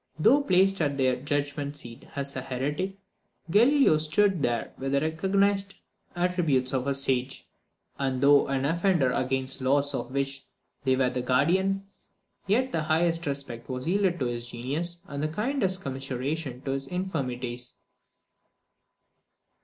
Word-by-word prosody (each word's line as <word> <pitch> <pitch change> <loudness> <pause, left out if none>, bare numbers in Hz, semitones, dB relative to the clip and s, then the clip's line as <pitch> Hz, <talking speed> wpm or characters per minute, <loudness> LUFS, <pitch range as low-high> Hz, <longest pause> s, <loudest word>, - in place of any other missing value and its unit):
Though 235 - +5
placed 195 -4 +3
at 145 -2 0
their 130 -2 +2
judgment 145 +1 -2
seat 120 -5 -9
as 140 0 -2
a 130 - -2
heretic, 145 +10 -3 0.5
Galileo 240 - +5
stood 180 +4 +2
there 120 -4 -1
with 135 +1 -2
the 140 - +4
recognised 195 +5 +1 0.4
attributes 170 -8 +1
of 130 0 -1
a 140 - +1
sage; 135 -1 0 0.5
and 135 -2 -1
though 140 +1 +5
an 135 0 -1
offender 170 -3 +2
against 130 +1 +1
the 130 0 -1
laws 145 +1 +3
of 120 -2 -3
which 135 0 -2 0.4
they 130 -1 +3
were 130 -1 +1
the 125 - -2
guardian, 180 +10 +2 0.6
yet 255 +6 +2
the 165 - 0
highest 165 +1 +2
respect 140 -4 -5
was 130 +2 -4
yielded 190 -1 +2
to 130 - 0
his 120 0 -3
genius, 150 +9 -2
and 140 0 -5
the 155 - +1
kindest 195 - -1
commiseration 135 0 -4
to 135 - -2
his 135 0 -3
infirmities. 125 -9 -3
145 Hz, 145 wpm, -27 LUFS, 130-180 Hz, 0.6 s, Though